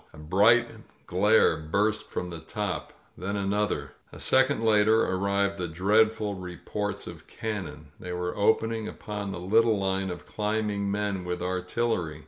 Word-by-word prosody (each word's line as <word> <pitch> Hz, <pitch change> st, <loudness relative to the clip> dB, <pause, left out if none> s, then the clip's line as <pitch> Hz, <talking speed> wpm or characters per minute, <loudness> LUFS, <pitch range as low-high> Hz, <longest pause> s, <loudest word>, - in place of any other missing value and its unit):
A -, -, -13 dB
bright 105 Hz, +10 st, +4 dB, 0.4 s
glare 105 Hz, 0 st, +4 dB
burst 105 Hz, +7 st, 0 dB
from 90 Hz, 0 st, -4 dB
the 85 Hz, -, -6 dB
top 100 Hz, +4 st, -4 dB
— -, -, -35 dB
then 100 Hz, +3 st, -3 dB
another. 100 Hz, -7 st, -1 dB, 0.2 s
A -, -, -11 dB
second 130 Hz, -3 st, +2 dB
later 110 Hz, 0 st, +4 dB
arrived 100 Hz, +1 st, 0 dB
the 90 Hz, -, -2 dB
dreadful 105 Hz, +5 st, +2 dB
re 90 Hz, -2 st, -7 dB
ports 105 Hz, -1 st, -4 dB
of -, -, -10 dB
cannon. 85 Hz, -9 st, -5 dB
They 90 Hz, -, -6 dB
were 90 Hz, 0 st, -3 dB
opening 110 Hz, +1 st, +1 dB
upon 105 Hz, -2 st, -5 dB
the 85 Hz, -, -5 dB
little 110 Hz, +4 st, +3 dB
line 95 Hz, 0 st, -1 dB
of 90 Hz, -1 st, -7 dB
climbing 105 Hz, -1 st, -1 dB
men 100 Hz, -2 st, -1 dB
with 90 Hz, 0 st, -3 dB
artillery 90 Hz, -3 st, -1 dB
100 Hz, 155 wpm, -27 LUFS, 90-105 Hz, 0.4 s, bright